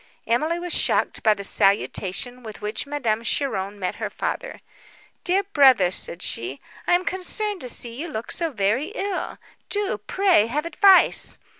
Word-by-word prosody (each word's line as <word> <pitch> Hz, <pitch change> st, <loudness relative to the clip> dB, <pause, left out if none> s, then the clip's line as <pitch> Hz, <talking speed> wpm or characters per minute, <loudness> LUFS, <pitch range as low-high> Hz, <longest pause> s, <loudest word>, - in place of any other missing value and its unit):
Emily 305 Hz, +9 st, +1 dB
was 350 Hz, 0 st, -3 dB
shocked -, -, +1 dB
by 215 Hz, -2 st, +4 dB
the 200 Hz, -, -7 dB
salutation 200 Hz, +5 st, +1 dB
with 220 Hz, -3 st, -9 dB
which 210 Hz, +6 st, -3 dB
Madame 240 Hz, -7 st, -1 dB
Cheron 205 Hz, -7 st, -2 dB
met 185 Hz, -2 st, -3 dB
her -, -, -3 dB
father—"Dear 395 Hz, -5 st, -4 dB
brother," 260 Hz, -, +6 dB
said 180 Hz, -1 st, -3 dB
she, 125 Hz, +4 st, -4 dB, 0.3 s
"I -, -, +3 dB
am 360 Hz, +1 st, +2 dB
concerned 390 Hz, +2 st, -3 dB
to 250 Hz, -, -4 dB
see 235 Hz, 0 st, 0 dB
you 295 Hz, +8 st, -5 dB
look 225 Hz, -8 st, -5 dB
so 335 Hz, -2 st, -2 dB
very 220 Hz, +5 st, 0 dB
ill; 395 Hz, -4 st, -3 dB, 0.3 s
do, 405 Hz, -, -1 dB
pray, 350 Hz, -, +2 dB
have 300 Hz, +7 st, -2 dB
advice!" 385 Hz, +2 st, +4 dB
255 Hz, 155 wpm, -23 LUFS, -, 0.3 s, brother